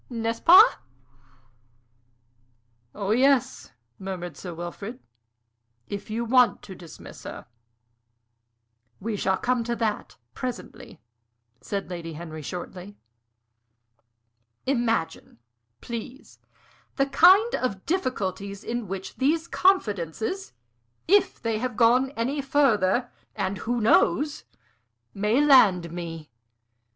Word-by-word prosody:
N'est 230 -2 -2
ce - - -15
pas?" 350 +2 +7 2.2
"Oh 200 -1 -2
yes," 265 +2 +2 0.3
murmured 180 -4 -6
Sir 180 +5 -8
Wilfrid, 195 +8 -7 0.9
"if 200 +1 -6
you 230 +2 -2
want 250 +1 +3
to 190 - -9
dismiss 175 -3 -12
her." - - -8 1.5
"We 220 +1 -3
shall 190 -1 0
come 250 -1 0
to 235 +1 -2
that 220 -3 -3 0.2
presently," 240 - -7 0.6
said 200 -1 -4
Lady 165 -2 -6
Henry, 155 0 -8
shortly. 180 +4 -8 1.7
"Imagine, 235 - -1 0.4
please, 235 +3 -8 0.6
the 275 - +2
kind 370 - +5
of 200 -7 -2
difficulties 200 - -3
in 240 -2 -4
which 190 +1 -7
these 315 +5 +1
confidences, 225 - 0 0.5
if 400 +3 +3
they 225 -2 -2
have 245 -1 -4
gone 250 +3 +4
any 265 +5 -1
further 245 -5 +2 0.2
and 195 -2 -2
who 240 +4 -2
knows? 285 +6 +2 0.7
may 215 +8 +2
land 195 - +5
me. 165 -4 -7
225 Hz, 100 wpm, -25 LUFS, 190-255 Hz, 2.2 s, pas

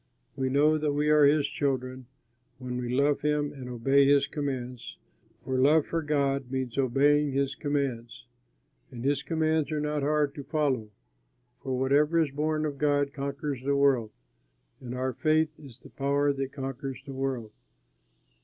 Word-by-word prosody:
We 130 -1 -1
know 150 +3 +3
that 150 -1 0
we 150 +1 +1
are 150 -1 +6
his 145 0 +3
children 130 -3 -3 0.5
when 125 -1 -5
we 120 - -4
love 140 +3 +2
him 150 -1 0
and 130 -3 -8
obey 135 +3 +3
his 140 0 +4
commands, 130 -4 -5 0.5
for 130 -1 -1
love 150 +3 +4
for 165 - -2
God 140 -3 0
means 130 -2 -3
obeying 140 +2 +2
his 140 0 0
commands. 130 -6 -3 0.6
And 120 +1 -8
his 140 0 +1
commands 160 -1 0
are 155 - -1
not 150 0 -1
hard 145 0 +1
to 140 - -7
follow, 140 -7 -1 0.7
for 130 -2 -2
whatever 145 +5 +3
is 155 -4 +1
born 155 +2 -1
of 145 -2 -4
God 145 -1 +1
conquers 140 -1 -4
the 140 +2 0
world. 135 -5 +3 0.7
And 125 -1 -7
our 130 0 -2
faith 155 +4 +1
is 135 -6 -13
the - - -15
power 140 +1 +1
that 135 -1 -4
conquers 135 -1 -6
the 140 - -7
world. 130 -5 -3
140 Hz, 165 wpm, -28 LUFS, 130-150 Hz, 0.7 s, are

